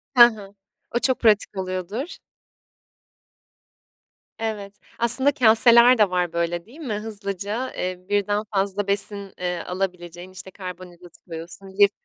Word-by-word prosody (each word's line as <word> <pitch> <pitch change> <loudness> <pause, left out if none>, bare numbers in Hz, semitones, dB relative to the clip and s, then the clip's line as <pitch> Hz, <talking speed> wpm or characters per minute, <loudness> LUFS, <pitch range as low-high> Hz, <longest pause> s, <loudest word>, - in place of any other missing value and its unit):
Hı 240 - +10
hı. 210 -4 -4 0.4
O - - +3
çok 260 0 +2
pratik 210 -3 +2
oluyordur. 190 - -4 2.2
Evet, 210 -3 -5 0.2
aslında 255 +4 +5
kâseler 235 0 +6
de 210 -3 +4
var 180 -2 -1
böyle 170 +1 -2
değil 260 +8 -16
mi? 265 -9 -4
Hızlıca, 210 +2 -4
eee, 180 0 -5
birden 205 +1 0
fazla 200 0 -1
besin, 200 0 -2
eee, 180 -1 -2
alabileceğin 180 -1 -5
işte 185 0 -10
karbonhidratı 180 -2 -10
koyuyorsun, 170 +3 -9
lif 200 0 +7
200 Hz, 125 wpm, -23 LUFS, 180-220 Hz, 2.2 s, Hı